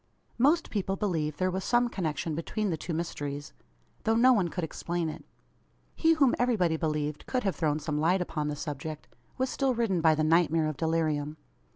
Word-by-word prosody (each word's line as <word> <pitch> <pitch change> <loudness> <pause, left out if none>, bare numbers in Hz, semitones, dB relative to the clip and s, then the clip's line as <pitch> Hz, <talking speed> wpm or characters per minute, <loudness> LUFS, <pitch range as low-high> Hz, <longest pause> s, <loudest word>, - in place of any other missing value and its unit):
Most 310 +7 +3
people 195 -2 -1
believed 160 -7 -1
there 185 0 +1
was 190 +1 -3
some 240 0 +3
connection 165 -6 -2
between 195 +6 -2
the - - 0
two 160 - -6
mysteries; 145 -3 -4 0.5
though 225 0 +2
no 255 +3 +6
one 195 -7 +2
could 175 +1 -4
explain 170 +1 -2
it. - - -8 0.7
He, 325 0 +4
whom 280 -6 +4
everybody 215 -10 +2
believed, 150 -2 -2
could 255 -1 -1
have 195 -2 0
thrown 150 -3 +1
some 150 -1 -2
light 175 +5 +3
upon 155 -4 -2
the 150 - -2
subject, 150 +1 -6 0.3
was 260 0 0
still 270 -2 +1
ridden 210 -7 +1
by 160 -1 +5
the 155 - 0
night 165 +2 +4
mare 165 -1 +2
of 155 -1 -2
delirium. 155 -1 -1
165 Hz, 195 wpm, -29 LUFS, 155-210 Hz, 0.7 s, no